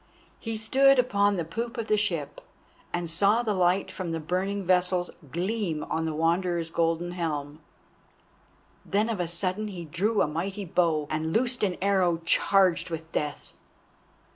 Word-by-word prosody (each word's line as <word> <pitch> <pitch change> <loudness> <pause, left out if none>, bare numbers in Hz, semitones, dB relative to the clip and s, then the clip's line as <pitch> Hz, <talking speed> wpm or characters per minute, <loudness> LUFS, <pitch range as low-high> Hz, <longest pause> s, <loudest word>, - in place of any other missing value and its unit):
He 225 -1 -4
stood 270 +5 +4
upon 205 -5 +2
the 170 - -2
poop 230 +9 -4
of 230 - -2
the 215 - +2
ship, 170 -9 -2 0.5
and 175 -1 -2
saw 200 +8 +2
the 215 -3 0
light 185 0 +1
from 185 -3 -5
the 165 - -2
burning 190 +5 -2
vessels 180 0 +2 0.2
gleam 175 -3 -2
on 160 0 0
the 160 - -2
Wanderer's 170 +1 0
golden 165 +1 0
helm. 150 -4 -3 1.2
Then 210 +3 0
of 220 -4 -2
a 175 - 0
sudden 185 +5 -2
he 180 -4 -7
drew 200 +7 +1
a - - 0
mighty 190 +6 -3
bow 165 -3 +1
and 155 +1 -1
loosed 245 +5 +1
an 190 -4 0
arrow 185 -4 +2
charged 180 -1 +3
with 165 0 -6
death. 150 -1 -4
180 Hz, 160 wpm, -27 LUFS, 165-205 Hz, 1.2 s, stood